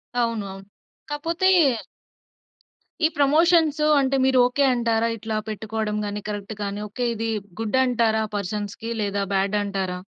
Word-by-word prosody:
అవును. 230 -4 0
అవును. 195 - -10 0.5
కాపోతే... 330 +5 0 1.6
ఈ - - +7
ప్రమోషన్స్ 310 +1 +4 0.2
అంటే 275 0 +1
మీరు 265 -1 +3
ఓకే. 250 +3 +1
అంటారా? 230 -1 +1
ఇట్లా 220 0 -4
పెట్టుకోవడం 215 0 -3
కానీ, 205 0 -4
కరెక్ట్‌గా‌ని 205 0 -4
ఓకే. 245 +4 -2
ఇది 225 +1 -2 0.3
గుడ్ 225 +4 +1
అంటారా? 225 -3 +2
పర్సన్స్‌కి 205 +3 -4
లేదా 200 -1 -1
బ్యాడ్ 195 +2 +1
అంటారా? 190 -2 -3
220 Hz, 125 wpm, -23 LUFS, 205-260 Hz, 1.6 s, ఈ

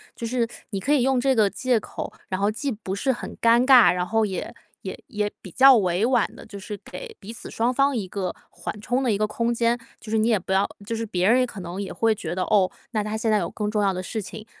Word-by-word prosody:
就 235 - -5
是 235 0 0 0.2
你 195 - -3
可 275 +10 +1
以 285 - +4
用 265 0 +2
这 265 +1 +2
个 215 -3 +4
借 245 +5 +1
口， - - -7 0.2
然 185 - -2
后 200 +1 +2
既 270 +6 -3
不 205 -4 -5
是 235 +7 -2
很 240 - -6
尴 235 +2 +5
尬， 255 -3 +8
然 180 0 -1
后 225 +4 +1
也 190 -3 -4 0.3
也 - - -6
也 210 -5 -2
比 190 - -10
较 265 +7 +7
委 185 0 +1
婉 245 -3 +3
地 - - -12
就 200 - -9
是 205 +2 -6
给 485 -3 -9
彼 215 +4 -9
此 - - -10
双 235 +3 0
方 275 +1 +2
一 210 -5 -2
个 185 -1 -4 0.2
缓 175 +4 -6
冲 245 +5 -1
的 250 -3 +1
一 205 - +1
个 215 - +1
空 230 +3 -1
间。 235 +1 +1 0.2
就 215 - -10
是 220 - +2
你 220 +1 +2
也 225 -3 +4
不 190 - -7
要 190 +1 +3 0.2
就 230 - -3
是 225 0 -3
别 185 -4 0
人 245 +3 +5
也 255 - +3
可 215 - -9
能 180 +2 -5
也 195 - -5
会 225 -1 +2
觉 210 -4 -5
得 185 - 0
哦， 195 -3 +3 0.2
那 215 -3 0
她 215 +1 -3
现 220 0 0
在 215 - +4
有 170 -3 -2
更 210 -1 -3
重 210 -1 +1
要 200 -1 +3
的 185 0 -4
事 220 +4 -4
情。 215 +2 -9
220 Hz, 300 characters per minute, -24 LUFS, 200-240 Hz, 0.3 s, 尬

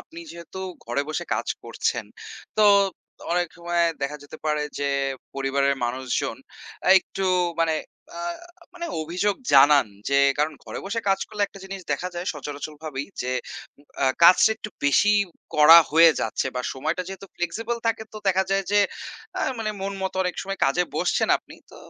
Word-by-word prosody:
আপনি 330 +1 -12
যেহেতু 170 +2 -10 0.3
ঘরে 120 +5 -1
বসে 155 - -3
কাজ - - -3 0.2
করছেন - - -2 0.5
তো 215 - +6 0.7
অনেক 175 0 +1
সময় 175 0 0 0.2
দেখা 140 +2 -2
যেতে 145 +2 -11
পারে 150 -1 +1 0.2
যে, 140 - 0 0.5
পরিবারের 140 0 +1
মানুষজন 125 +1 -2 0.5
আ - - +3
একটু 195 +1 -5 0.4
মানে 165 -1 +2 0.4
আ - - -4 0.5
মানে 345 -1 -5 0.2
অভিযোগ 180 +6 0 0.2
জানান 140 -1 +7 0.2
যে, 140 - +2 0.2
কারণ 150 +2 +1
ঘরে - - -6
বসে 225 +3 -2
কাজ 195 0 +3
করলে 210 -1 -3
একটা 195 -1 -10
জিনিস 195 0 -7
দেখা 175 +6 -2
যায় 175 +1 -5
সচরাচর 145 0 -7
ভাবেই 140 -3 -4 0.2
যে 125 +1 -2 0.5
উ - - -20 0.2
আ - - +4 0.2
কাজটা 180 +6 +8
একটু 215 -1 -8
বেশিই 205 +9 +4 0.3
করা 155 +2 +9
হয়ে 165 +2 +7
যাচ্ছে, 110 - -1
বা 125 - -1
সময়টা 155 +7 -2
যেহেতু 195 +1 -8
flexible 225 +7 -2
থাকে 225 -1 0
তো - - -9
দেখা 190 0 +2
যায় 195 0 +1
যে 205 - +5 0.6
আ - - -1 0.2
মানে 220 -1 -1
মন 195 +1 -3
মতো 190 0 -3
অনেক 180 -1 -2
সময় 195 0 -5
কাজে 175 +6 +2
বসছেন - - +1
আপনি। - - -15 0.2
তো - - -13
170 Hz, 170 wpm, -24 LUFS, 145-195 Hz, 0.7 s, করা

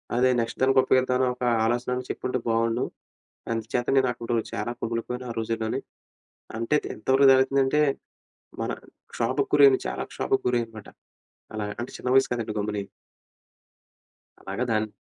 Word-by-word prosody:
అదే 130 +1 +4
నెక్స్ట్ 115 - -3
దానికి 135 0 +5
ఉప్పయోగిద్దామని 130 0 +2
ఒక 125 - -7 0.2
ఆలోచనైనా 125 +2 -1
చెప్పుంటే 130 0 -2
బావుండు. 115 +2 +1 0.7
అందుచేత 115 +2 -2
నేనక్కడు 120 -2 0 0.2
చాలా 120 - -3
కుములిపోయాను 120 +2 -3
ఆ - - -5
రోజుల్లోనీ! 115 +3 -2 0.8
అంటే 115 +6 0
తే - - -5
ఎంతవరకు 135 +1 +3
జరుగుతుందంటే 135 +2 +3 0.8
మన - - -1 0.4
క్షోభకురైన 405 0 +4
చాలా - - -3
క్షోభకు 400 0 -1
గురయ్యానమాట! 115 -3 -2 0.7
అలాగ 105 -1 -3
అంటే 125 - -6
చిన్న 125 - -4
వయస్సు 135 - +4
కదండీ 110 -3 -4
గమ్ముని! 105 -1 -2 1.6
అలాగా 125 - -3
దాన్ 110 0 +1
125 Hz, 125 wpm, -26 LUFS, 115-130 Hz, 1.6 s, దానికి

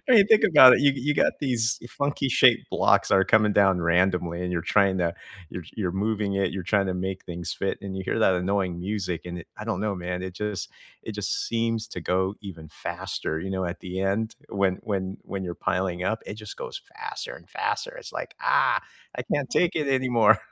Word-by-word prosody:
mean, 220 -6 +7
think 220 -1 +6
about 130 -6 +9
it, - - +1
you 140 -1 +5
you 140 +2 0
got - - +3
these 120 -4 +1
funky 140 -1 -1
shaped - - +4
blocks - - +3
that - - +4
are 95 - +4
coming 110 -1 +4
down 95 -3 +4
randomly, 90 0 +1
and 90 - -3
you're 85 -2 -1
trying 100 -2 +2
to 85 -1 +1 0.4
you're 90 - -7
you're 95 -5 -1
moving 105 0 -1
it, 100 0 0
you're 95 -1 -4
trying 100 +2 +1
to 95 - -1
make 95 +1 -4
things 85 -1 -5
fit, 95 - -2
and 95 -1 -5
you 95 - -4
hear - - -1
that 95 -4 +4
annoying 90 -1 -1
music, 95 -2 -3
and 90 0 -6
it - - -14
I 105 - -6
don't 110 -4 -2
know, 105 -1 -1
man, 90 0 -4
it 95 -1 -6
just 105 -3 -4 0.3
it - - -6
just - - -2
seems 115 -1 -1
to 90 - -6
go 95 +3 0
even 85 -6 -9
faster, 80 0 -4
you 95 - -5
know, 95 -1 -2
at 85 0 -5
the 95 0 -5
end, 100 +4 -1
when 95 -2 +1
when 95 -2 -3
when 95 -1 -5
you're 85 -1 -4
piling 90 -1 -1
up, 110 +4 -1
it 105 - -5
just 105 -1 -9
goes 390 - -6 0.2
faster - - -6
and - - -15
faster, - - -3
it's - - -10
like, - - -6
"Ah, - - +3 0.4
I - - -1
can't - - -2
take 180 -6 +2
it 150 -3 -1
anymore." 125 -5 +4
100 Hz, 220 wpm, -25 LUFS, 90-110 Hz, 0.4 s, about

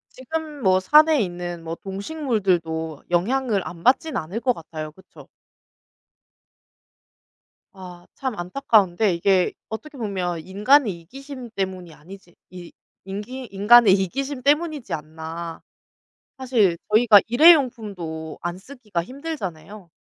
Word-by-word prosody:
지금 300 +2 -6
뭐 185 -1 +4
산에 305 +7 +5
있는 175 -3 -5
뭐 165 0 -5
동식물들도 190 - -2
영향을 210 +3 0
안 170 -1 -10
받지는 265 - +2
않을 175 +8 -5
것 250 0 +1
같아요. 155 -3 -8
그쵸? 190 +4 -17 2.5
아. 180 -2 -12
참 260 -4 -4
안타까운데 200 -1 +2
이게 185 +2 +2 0.2
어떻게 285 +7 -8
보면 185 -7 -3
인간의 205 - +2
이기심 265 - -10
때문이 185 -4 -4
아니지 175 +3 -15
이 180 -1 -11 0.3
인기 210 +7 -7
인간의 210 +1 +6
이기심 255 +9 -2
때문이지 295 -1 0
않나. 160 +2 -7 0.8
사실 230 -9 +2
저희가 215 -2 +7
일회용품도 220 - +3
안 175 +1 -4
쓰기가 210 -6 -5
힘들잖아요. 205 - -7
195 Hz, 265 characters per minute, -23 LUFS, 175-260 Hz, 2.5 s, 저희가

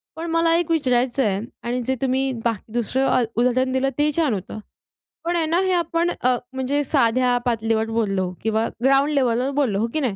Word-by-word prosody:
पण 325 - -5
मला 330 0 +3
एक 335 -1 0
विचारायचं 255 -3 +1
आहे 195 -2 0 0.3
आणि 250 +1 -1
जे 265 - 0
तुम्ही 265 0 +1
बाकी 225 -2 -3
दुसरं 245 +2 +1
उदाहरण 250 +2 +1
दिलं 260 +1 +1
ते 295 - +2
ही 300 - +2
छान 300 -8 +2
होतं. 195 +2 -5 0.7
पण 345 +1 0
आहे 330 -2 +1
ना 335 +3 +1
हे 375 -1 0
आपण 340 0 0
अ, 250 0 +3 0.2
म्हणजे 270 +3 -1
साध्या 250 -2 +2
पातळीवर 225 -1 0
बोललो 195 -5 -1
किंवा 220 0 +1 0.2
ग्राउंड 275 +2 +4
लेवलवर 255 0 +1
बोललो, 235 -9 +1
हो 230 - +1
की 310 - 0
नाही? 245 -9 -1
255 Hz, 195 wpm, -22 LUFS, 230-290 Hz, 0.7 s, ग्राउंड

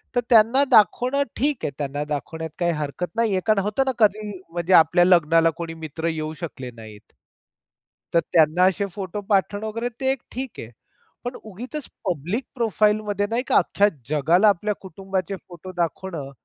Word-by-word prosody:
तर 245 - +3
त्यांना 235 +4 +6
दाखवणं 250 +6 +4
ठीक 285 +1 0
आहे. - - -1
त्यांना 145 0 -2
दाखवण्यात 160 +3 -4
काही 175 -1 +2
हरकत 155 +4 -4
नाही 230 -2 +1
आहे, 185 - +1
कारण 215 -2 +4
होतं 215 +6 0
ना 265 - +1
कधी 215 0 +3 0.2
म्हणजे 175 +2 -1
आपल्या 175 +1 +6
लग्नाला 165 -2 +4
कोणी 165 -1 -5
मित्र 160 +2 -4
येऊ 155 -1 -3
शकले 130 -7 -6
नाहीत. 110 -3 -13 1.0
तर 170 - +5
त्यांना 160 +2 +4
असे 190 +2 +1
फोटो 195 0 -5
पाठवणं 205 +1 +1
वगैरे 230 +3 -3
ते 265 0 +2 0.2
ठीक 255 0 -6
आहे. 115 - -8 0.5
पण 245 +1 -4
उगीचच 245 +8 -7 0.2
पब्लिक 180 - -2
प्रोफाइल 215 -3 +2
मध्ये 205 -1 -1
नाही 235 +2 0
का, - - +4
अख्ख्या 205 - +3 0.2
जगाला 165 +8 +4
आपल्या 210 +2 0
कुटुंबाचे 190 +1 -4
फोटो 180 +1 -10
दाखवणं, 165 -4 -3
190 Hz, 165 wpm, -23 LUFS, 160-215 Hz, 1.0 s, त्यांना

